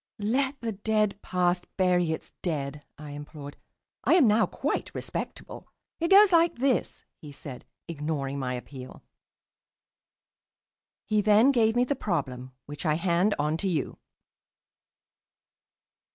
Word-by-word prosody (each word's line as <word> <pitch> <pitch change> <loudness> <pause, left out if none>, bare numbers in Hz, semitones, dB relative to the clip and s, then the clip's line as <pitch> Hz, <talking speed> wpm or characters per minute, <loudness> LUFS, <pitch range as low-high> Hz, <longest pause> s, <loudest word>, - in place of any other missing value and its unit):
"Let 265 +6 0
the 230 -1 -2
dead 215 0 0
past 175 -1 0
bury 180 -3 +2
its 160 - -5
dead," 145 -4 -3
I 150 -1 -9
implored. 145 0 -9 0.5
"I - - +4
am 335 -7 +6
now 215 +1 +4
quite - - -3
respectable." - - -6 0.3
"It 335 0 0
goes 400 0 +7
like 335 0 +4
this," 260 +1 -1
he 150 - -11
said, 140 -2 -9 0.2
ignoring 145 -3 -3
my 125 -2 -2
appeal. 130 +1 -10 2.0
He 215 -1 +1
then 215 +6 +5
gave 225 -3 +2
me 245 - +4
the 280 +3 -1
problem, 130 - -3
which 145 0 -8
I 155 -3 +2
hand 175 +4 +1
on 150 +2 0
to 195 - -2
you. 160 -7 -2
180 Hz, 130 wpm, -27 LUFS, 145-220 Hz, 2.0 s, goes